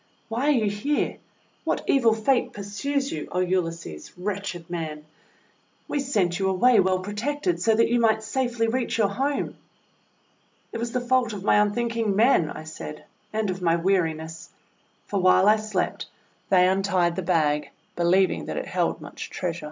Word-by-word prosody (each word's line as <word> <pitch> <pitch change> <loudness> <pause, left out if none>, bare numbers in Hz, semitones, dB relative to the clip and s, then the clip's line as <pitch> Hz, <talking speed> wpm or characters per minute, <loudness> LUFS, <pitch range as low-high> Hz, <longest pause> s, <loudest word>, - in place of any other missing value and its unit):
"Why 240 +5 -1
are 300 - +5
you 225 -6 +1
here? 210 +9 -1 0.5
What - - -1
evil 235 -5 +4
Fate 240 +4 +1
pursues 270 +8 -2
you, 150 - -4
O - - -3
Ulysses, 170 - -2
wretched 190 -3 -4
man? 155 -3 -5 0.8
We 290 - -1
sent 200 -10 0
you 190 0 +1
away 225 +5 +4
well 190 -1 +3
protected, 290 - -2
so 225 -1 +3
that 230 - +4
you 240 +1 +2
might 220 -1 +3
safely 240 -2 -1
reach 240 +1 -1
your 210 -3 +3
home!' 275 +7 -2 1.1
:*It 230 - -5
was 235 0 -3
the 250 - 0
fault 245 -2 +1
of 195 -2 -6
my - - +4
unthinking 225 0 +1
men," 215 - +4
I - - -7
said, 155 -1 -8 0.3
"and 215 -2 -1
of 185 0 -6
my 165 -1 +3
weariness. 165 -3 -1 0.6
For 200 - -2
while 185 +1 +5
I 215 +1 +6
slept 215 -4 -2 0.4
they 180 -1 +5
untied 190 -2 +1
the 190 - -2
bag, 150 -5 +1 0.3
believing 180 +2 +2
that - - -4
it - - -3
held - - -1
much - - -8
treasure." 170 -2 -3
200 Hz, 165 wpm, -25 LUFS, 180-235 Hz, 1.1 s, I